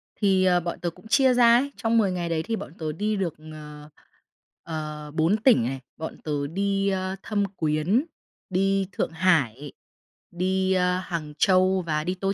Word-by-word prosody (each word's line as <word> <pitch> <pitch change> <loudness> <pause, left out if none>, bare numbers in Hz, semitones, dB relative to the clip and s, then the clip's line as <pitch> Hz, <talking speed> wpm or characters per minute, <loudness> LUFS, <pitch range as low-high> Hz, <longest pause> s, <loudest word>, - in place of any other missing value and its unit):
Thì 190 -3 +2 0.2
bọn 170 - -4
tớ 175 - -2
cũng 195 - -16
chia 265 +1 +4
ra 235 -1 +6
ấy, 280 +3 -1
trong 230 0 +1
10 205 -4 +3
ngày 175 -2 -3
đấy 160 -1 -1
thì 230 - -2
bọn 165 - -8
tớ 155 -1 -2
đi 210 +7 -1
được, 185 -5 -2 0.2
ờ, 150 -1 -11 0.7
ờ 150 -2 -6
4 165 +7 +2
tỉnh 230 - +4
này. 130 +3 -3 0.2
Bọn 160 - -6
tớ 145 -2 -2
đi, 195 +4 0
ơ, 190 0 -2
Thâm 205 -2 0
Quyến, 160 - +1 0.4
đi 195 0 +1
Thượng - - -2
Hải, 150 -6 +1 0.6
đi, 190 +2 0
ơ, 180 0 +2
Hàng 170 -5 -5
Châu 185 0 +3
và 155 -2 -2
đi 180 +3 -2
Tô 195 +1 -1
185 Hz, 180 wpm, -25 LUFS, 155-195 Hz, 0.7 s, ra